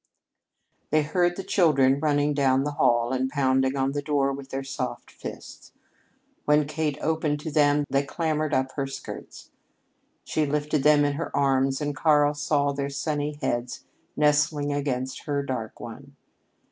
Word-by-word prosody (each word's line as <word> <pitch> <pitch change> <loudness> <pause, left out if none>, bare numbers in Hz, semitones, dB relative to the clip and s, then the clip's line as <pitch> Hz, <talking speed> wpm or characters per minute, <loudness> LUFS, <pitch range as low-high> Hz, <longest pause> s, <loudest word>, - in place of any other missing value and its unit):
They 155 0 +3
heard 175 +3 +1
the 195 - -5
children 140 -8 +3
running 145 -1 +1
down 135 -2 +2
the 145 - -2
hall 120 -3 +2
and 130 0 0
pounding 130 -1 +1
on 135 0 +1
the 145 +1 -2
door 140 -2 +1
with 135 0 -8
their 135 0 -4
soft 125 -3 -5
fists. - - -10 0.7
When 150 0 +4
Kate 150 -1 -2
opened 155 -2 0
to 160 - -5
them, 145 -1 +3
they 140 +1 +1
clambered 155 +1 -2
up 130 -1 0
her 135 -1 -3
skirts. 135 - -9 0.7
She 155 -1 -1
lifted 150 0 0
them 145 0 +5
in 145 - +1
her 165 - -3
arms, 135 0 +2
and 145 -1 -2
Karl 150 0 +3
saw 145 -1 +1
their 140 0 -3
sunny 145 +1 -2
heads 120 +1 -2 0.3
nestling 150 -1 +2
against 130 -2 -3
her 145 -1 -1
dark 130 -5 -5
one. 135 +4 -10
145 Hz, 160 wpm, -25 LUFS, 135-150 Hz, 0.7 s, them